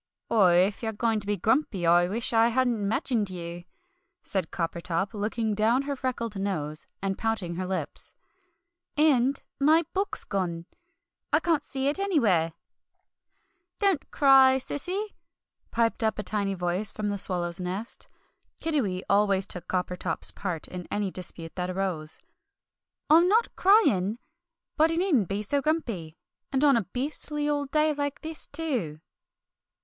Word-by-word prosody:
"Oh, 210 -5 +5
if 180 +3 +3
you're 220 -1 -2
going 225 0 0
to 200 - -8
be 205 0 0
grumpy, 220 - +1
I 175 +1 +5
shall - - -4
wish 230 +4 0
I 225 0 +5
hadn't 240 -4 +1
'magined 220 -1 0
you," 175 -1 -7 0.6
said 185 -4 -2
Coppertop, 170 +4 -2
looking 215 +1 -1
down 225 +6 +2
her 280 0 -3
freckled 240 -4 -3
nose 155 -6 -3 0.2
and 195 -1 -2
pouting 220 -6 -1
her 185 0 -3
lips; 185 0 -4 0.8
"and 275 -3 +3 0.2
my 310 +4 +4
book's 390 +2 0
gone! 175 -4 -3 0.7
I - - +5
can't 325 -4 +1
see 270 -1 -3
it 290 +6 0
anywhere!" 215 - +2 1.2
"Don't 395 -7 +1
cry, 270 -2 +6
Cece!" 365 +10 -3 0.6
piped 230 0 0
up 220 -1 +1
a 210 - -3
tiny 200 0 -1
voice 180 +3 -1
from 210 -1 -3
the 200 -1 -2
swallow's 175 -2 +1
nest. 185 +5 -4 0.5
Kiddiwee 230 - -1
always 200 -1 +3
took 180 -4 -8
Coppertop's 180 -1 -1
part 180 -5 -4
in 180 -1 -7
any 205 -2 -1
dispute 170 -3 -5
that 180 0 -3
arose. 180 -5 -1 0.9
"I'm 330 +3 +6
not 445 +5 +2
crying! 230 - +4 0.6
But 315 +1 +5
he 330 - -1
needn't 320 - +2
be 200 +2 -2
so 280 +7 0
grumpy, 230 - -2 0.3
and 270 +1 +1
on 280 -2 +6
a 230 -4 +1
beastly 295 - -3
old 290 -2 -1
day 305 +1 +2
like 285 -1 -3
this, 320 -1 -7
too!" 255 - -3
215 Hz, 150 wpm, -27 LUFS, 185-280 Hz, 1.2 s, cry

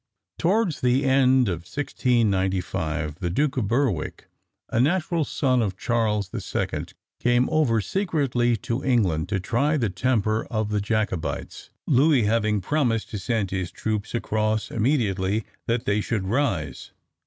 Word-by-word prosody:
Towards 195 -2 +1
the 125 +2 +2
end 130 -2 +4
of 90 -4 -1
1695, 95 - -1
the 90 - -2
Duke 140 - 0
of 115 -6 0
Berwick, 115 - -1 0.4
a 110 - 0
natural 165 +4 +2
son 130 -3 +1
of 95 -4 -2
Charles 105 -4 0
the - - -5
Second, - - -3 0.2
came 120 +1 +3
over 145 -8 +3
secretly 135 - 0
to 120 +4 -2
England 95 - +1
to 100 -2 0
try 135 - +1
the 115 -8 0
temper 110 +1 0
of 110 -2 -1
the 105 -1 0
Jacobites, 105 -5 -3 0.2
Louis 140 -1 +4
having 105 -1 +1
promised 120 -1 0
to 105 - -3
send 110 -2 -1
his 95 -2 -2
troops 110 +3 -3
across 110 -1 -1
immediately 105 -5 0 0.2
that 115 +2 0
they 105 -3 +1
should 105 -2 -2
rise. 95 - -1
115 Hz, 145 wpm, -24 LUFS, 100-130 Hz, 0.4 s, end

